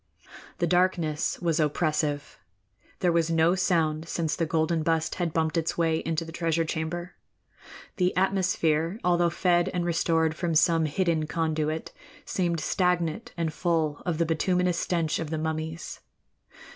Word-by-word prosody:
The 175 - +1
darkness 170 -3 +1
was 165 -2 +1
oppressive. 150 -1 -1 0.6
There 180 - +3
was 165 -1 +1
no 165 +1 +3
sound 165 -3 0
since 160 -3 -1
the 165 - -1
golden 160 +1 +1
bust 160 0 0
had 170 -2 0
bumped 160 0 0
its 165 0 -1
way 165 -2 +2
into 165 0 -2
the 165 - -9
treasure 165 0 0
chamber. 175 +2 -4 0.8
The 180 -2 +1
atmosphere, 185 -2 +1
although 175 -1 +3
fed 175 0 +2
and 175 -1 0
restored 165 -1 +1
from 170 -1 -1
some 165 +1 +4
hidden 160 0 0
conduit, 160 -1 -1 0.3
seemed 170 -3 -1
stagnant 180 +2 0
and 165 -2 -1
full 160 -4 0
of 175 -4 -1
the 170 - +2
bituminous 180 +2 +1
stench 165 -4 0
of 160 - -4
the 160 - -2
mummies. 160 +1 -4
165 Hz, 145 wpm, -27 LUFS, 160-175 Hz, 0.8 s, some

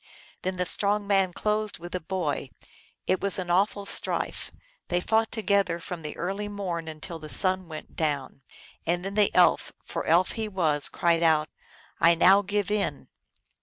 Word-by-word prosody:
Then 185 0 -2
the 180 0 -1
strong 205 +3 +1
man 195 -2 +2
closed 215 +2 0
with 175 +1 -10
the 180 - -2
boy. 160 -6 -3 0.6
It 185 - 0
was 200 +1 +3
an 180 -2 -3
awful 200 +2 +1
strife; - - -1 0.4
they 175 - 0
fought 220 +4 +1
together 200 -5 +1
from 175 -1 -7
the 150 -1 -7
early 195 +4 -3
morn 185 -5 -4
until 160 +2 -7
the 155 -1 -10
sun 185 +2 +2
went 155 -1 -10
down, 145 -4 -2 0.4
and 175 +2 -1
then 195 - -4
the 210 -1 +3
Elf 180 - +3
for - - -5
elf 170 +3 +3
he 220 -1 -3
was 160 -8 +2
cried 170 -1 +1
out, 155 -2 +3 0.3
" - - -26
I 170 +1 +5
now 195 +4 +6
give 205 0 -2
in 210 -1 -2
185 Hz, 175 wpm, -26 LUFS, 165-200 Hz, 0.6 s, now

